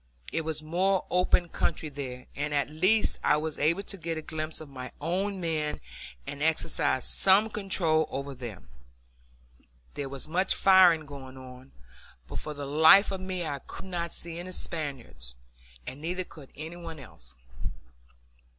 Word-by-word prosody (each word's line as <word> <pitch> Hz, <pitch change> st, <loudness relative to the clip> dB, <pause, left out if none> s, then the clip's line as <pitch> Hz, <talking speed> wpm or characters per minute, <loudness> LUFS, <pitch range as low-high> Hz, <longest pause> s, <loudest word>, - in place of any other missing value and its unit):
It 165 Hz, -, +1 dB
was 155 Hz, -1 st, -2 dB
more 185 Hz, +4 st, +1 dB
open 180 Hz, -1 st, +3 dB
country 155 Hz, -1 st, -1 dB
here, 130 Hz, -3 st, -6 dB
and 145 Hz, +1 st, -2 dB
at 140 Hz, 0 st, 0 dB
least 185 Hz, +8 st, +4 dB
I -, -, +4 dB
was 155 Hz, 0 st, -3 dB
able 165 Hz, +7 st, +2 dB
to 195 Hz, -, -3 dB
get 165 Hz, -2 st, -3 dB
a 155 Hz, -, -5 dB
glimpse 155 Hz, 0 st, -3 dB
of 155 Hz, -, -9 dB
my 130 Hz, -2 st, -8 dB
own 190 Hz, +5 st, -1 dB
men 155 Hz, -3 st, -2 dB, 0.5 s
and 145 Hz, -, -7 dB
exercise 150 Hz, -4 st, +2 dB
some 200 Hz, +3 st, +6 dB
control 175 Hz, -7 st, +1 dB
over 140 Hz, +1 st, -4 dB
them. 115 Hz, -, -9 dB, 1.3 s
There 140 Hz, -1 st, -4 dB
was 135 Hz, +1 st, -5 dB
much 180 Hz, +5 st, +1 dB
firing 185 Hz, -5 st, +6 dB
going 135 Hz, -2 st, -10 dB
on, 130 Hz, 0 st, -12 dB, 0.6 s
but -, -, -5 dB
for 150 Hz, -, -6 dB
the 145 Hz, 0 st, -5 dB
life 160 Hz, +8 st, +7 dB
of 190 Hz, -1 st, -4 dB
me 185 Hz, -2 st, -3 dB
I 145 Hz, -2 st, -3 dB
could -, -, -10 dB
not 170 Hz, -3 st, -3 dB
see 170 Hz, 0 st, -3 dB
any 185 Hz, +1 st, -6 dB
Spaniards, 130 Hz, -, -3 dB, 0.5 s
and 135 Hz, +3 st, -7 dB
neither 180 Hz, +3 st, -2 dB
could 150 Hz, -6 st, -14 dB
any 160 Hz, +3 st, -7 dB
one 165 Hz, -3 st, -8 dB
else. 60 Hz, -, -11 dB
155 Hz, 160 wpm, -28 LUFS, 140-175 Hz, 1.3 s, life